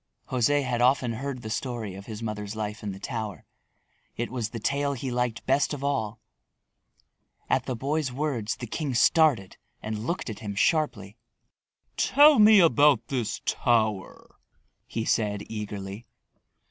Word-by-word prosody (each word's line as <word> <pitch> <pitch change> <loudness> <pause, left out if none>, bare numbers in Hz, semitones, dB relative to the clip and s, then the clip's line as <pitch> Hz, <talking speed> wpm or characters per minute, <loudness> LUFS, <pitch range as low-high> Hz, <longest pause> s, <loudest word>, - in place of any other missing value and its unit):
José 140 +3 +2
had 125 -2 -1
often 125 -1 +3
heard 130 +1 -5
the 110 - -5
story 115 -4 -3
of 100 +1 -10
his 110 0 -7
mother's 105 -1 -4
life 105 0 -4
in 105 - -4
the 95 - -9
tower. 110 -2 -5 0.7
It 120 0 -3
was 120 -4 -3
the 115 - -6
tale 140 +5 0
he 130 0 -4
liked 120 -1 -2
best 140 +3 +2
of 140 - -8
all. 115 -6 -1 1.3
At - - +1
the 130 - -2
boy's 140 +3 -1
words 125 -5 -2
the 120 - -7
king 135 +2 -3
started 125 - +3 0.2
and 110 +1 -5
looked 175 - -2
at 110 - -9
him 105 -2 -6
sharply. 105 - 0 0.8
"Tell 295 -1 +6
me 210 0 +8
about 145 - +4
this 125 -6 -2
tower," 110 -5 -1 0.5
he 115 -1 -3
said 105 -3 0
eagerly. 105 0 -6
120 Hz, 150 wpm, -26 LUFS, 105-140 Hz, 1.3 s, me